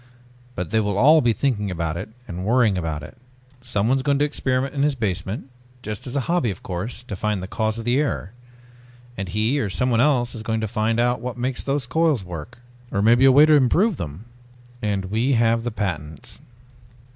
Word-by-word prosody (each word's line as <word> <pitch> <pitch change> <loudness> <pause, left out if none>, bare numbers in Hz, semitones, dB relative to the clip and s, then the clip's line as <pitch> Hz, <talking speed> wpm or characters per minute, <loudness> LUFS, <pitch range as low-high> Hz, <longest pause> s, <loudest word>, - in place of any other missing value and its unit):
But 90 0 -4
they 110 - +3
will 105 -2 -1
all 155 +7 +6
be 120 - +3
thinking 110 -4 -1
about 85 -3 -2
it 90 +5 -5 0.2
and 90 +1 -5
worrying 115 -1 +3
about 80 -4 -3
it. 75 - -11 0.5
Someone 125 +1 +1
is - - -1
going 140 +1 +1
to 145 - +3
experiment 130 -2 -1
in 140 - -1
his 145 -1 +2
basement 105 +2 -3 0.3
just 105 +2 -5
as 125 - -5
a 140 - +1
hobby 170 -3 0
of 95 - -6
course 100 +7 -5
to 115 -5 -6
find 105 -1 -2
the - - -5
cause 110 +1 -1
of 115 - -6
the 120 +3 +2
error. 140 -9 -2 0.8
And 95 -3 -5
he 110 +8 +1
or 110 - -1
someone 120 +4 +1
else 125 -4 +2
is 115 - -6
going 110 0 -1
to 110 - -2
find 110 +1 0
out 120 -1 +1
what 125 0 -5
makes 125 +1 -2
those 140 -1 -1
coils 150 - +1
work, 85 -2 -8 0.3
or 100 -2 -1
maybe 120 +4 +5
a 135 - +8
way 145 +3 +7
to 155 - +4
improve 160 - +3
them!" 80 +6 -7 0.6
"And 100 -3 -1
we 115 +8 +1
have 115 -1 +2
the 120 - -1
patents...." 85 - -5
115 Hz, 210 wpm, -23 LUFS, 100-130 Hz, 0.8 s, a